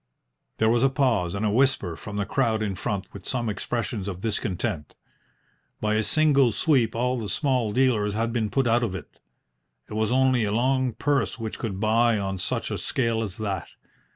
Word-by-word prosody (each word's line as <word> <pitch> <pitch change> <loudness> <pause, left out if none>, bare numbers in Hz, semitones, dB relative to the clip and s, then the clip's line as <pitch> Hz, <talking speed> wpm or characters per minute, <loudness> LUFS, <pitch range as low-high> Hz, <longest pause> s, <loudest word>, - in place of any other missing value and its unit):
There 110 - +2
was 115 +1 +3
a 135 - +4
pause 115 -10 +1
and 100 +2 -1
a 105 - +2
whisper 120 -8 +2
from 105 +4 -7
the 100 - 0
crowd 115 -3 +1
in 100 -2 -1
front, 95 +1 -3
with 100 -3 -9
some 120 -3 -1
expressions 110 0 -3
of 95 -2 -5
discontent. 95 - -2 0.8
By 105 0 0
a 110 - +2
single 140 -1 +3
sweep 120 -2 +2
all 125 +2 0
the 105 -3 -4
small 125 -1 +1
dealers 105 -4 +2
had 115 +1 -1
been 110 -3 0
put 135 +3 +1
out 120 +1 +3
of 110 -6 -1
it. 80 -7 -10 0.7
It - - -9
was 110 +1 0
only 130 -2 +3
a 105 - 0
long 130 +2 +1
purse 145 +1 0
which 110 -2 -5
could 100 -5 -4
buy 115 +2 +3
on 95 -1 -3
such 90 - -2
a - - -2
scale 115 -3 0
as 105 -2 -4
that. 100 -5 -3
110 Hz, 195 wpm, -25 LUFS, 100-125 Hz, 0.8 s, a